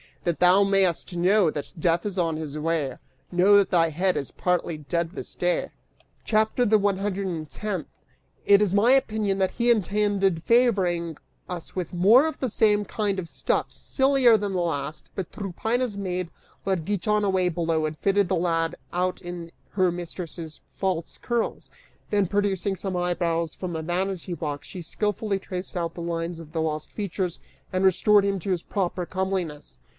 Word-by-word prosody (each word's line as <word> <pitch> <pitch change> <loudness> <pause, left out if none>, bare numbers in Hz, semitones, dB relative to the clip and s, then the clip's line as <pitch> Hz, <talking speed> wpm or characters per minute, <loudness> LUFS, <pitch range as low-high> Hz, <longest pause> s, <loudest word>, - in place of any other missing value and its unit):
That 170 -2 -1
thou 180 +3 +6
may'st 195 -3 +1
know 185 +1 +4
that 145 -1 -5
Death 170 +2 +1
is 200 -2 -5
on 165 -3 +1
his 155 -2 -5
way, 150 -4 -1 0.4
Know 185 +3 +5
that 200 - +3
thy 165 -2 +4
head 180 +4 +1
is 140 - -3
partly 175 -2 -1
dead 170 +3 -2
this - - -7
day!" - - 0 0.5
CHAPTER 220 +3 +2
THE 215 -1 +5
ONE 200 -2 +1
HUNDRED 200 -1 -2
AND 160 -5 -4
TENTH. 195 -5 -4 0.6
It 200 0 +6
is 200 -3 +2
my 210 +5 +5
opinion 215 -7 +2
that 190 -1 +2
he 240 0 +2
intended 200 -4 +1
favoring 185 - +2 0.3
us 175 -2 -6
with 180 -1 -3
more 215 - +6
of 315 - -5
the 260 - -1
same 210 -1 +3
kind 205 -2 -1
of 175 -3 -4
stuff, - - -1
sillier 265 -4 +3
than 205 -1 -3
the 180 - 0
last, 155 -2 -3
but 190 -3 -4
Tryphaena's 220 +4 -2
maid 185 -3 -3 0.4
led 190 -5 0
Giton 210 +2 +1
away 190 -2 +2
below 165 -2 0
and 155 0 -3
fitted 200 +1 +2
the 190 - +1
lad 165 -1 0 0.2
out 180 +1 -1
in 175 -1 -7 0.2
her 185 -3 +2
mistress' 170 -2 -6
false 185 -4 -2
curls; 240 -1 -2 0.4
then 205 -2 +2
producing 200 0 0
some 190 0 -4
eyebrows 170 -2 0
from 180 -3 -5
a 160 - -2
vanity 180 +1 -2
box, 150 -3 -4
she 180 - -7
skillfully 210 +3 -1
traced 185 0 -6
out 170 -1 -2
the 175 - -6
lines 170 0 -3
of 160 -2 -11
the 160 - 0
lost 155 -1 -3
features 190 -4 -3 0.3
and 185 +1 +1
restored 205 +2 +5
him 200 -1 0
to 190 +3 -3
his 175 -3 -1
proper 180 -2 -2
comeliness. 185 - -3
185 Hz, 175 wpm, -25 LUFS, 170-205 Hz, 0.6 s, thou